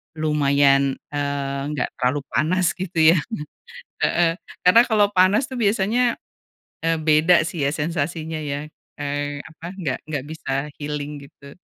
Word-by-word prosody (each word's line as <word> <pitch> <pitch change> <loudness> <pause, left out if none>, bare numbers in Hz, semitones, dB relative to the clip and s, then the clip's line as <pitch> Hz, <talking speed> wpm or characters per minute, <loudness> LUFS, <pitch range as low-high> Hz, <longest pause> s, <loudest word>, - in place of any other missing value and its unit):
lumayan, 140 -3 +3 0.2
eee, 140 -1 -2
enggak 150 -3 -2
terlalu 135 +3 0
panas, 180 +3 +2
gitu 165 -4 +4
ya. 170 - +3 0.9
Heeh, 170 0 +2 0.2
karena 185 +6 +7
kalau 210 -3 +3
panas 200 +7 +3
tuh 260 - -6
biasanya, 225 +3 +2 0.7
eee, 165 0 +1
beda 155 +2 +4
sih 165 -1 -4
ya 140 - +2
sensasinya 160 +1 -3
ya, 145 0 -4 0.3
eee, 145 0 -3
apa 160 +1 -12
nggak 150 -8 -2
nggak 145 -3 -3
bisa 145 -2 -4
healing, 145 0 -4
gitu. 140 -2 -15
155 Hz, 135 wpm, -22 LUFS, 145-175 Hz, 0.9 s, karena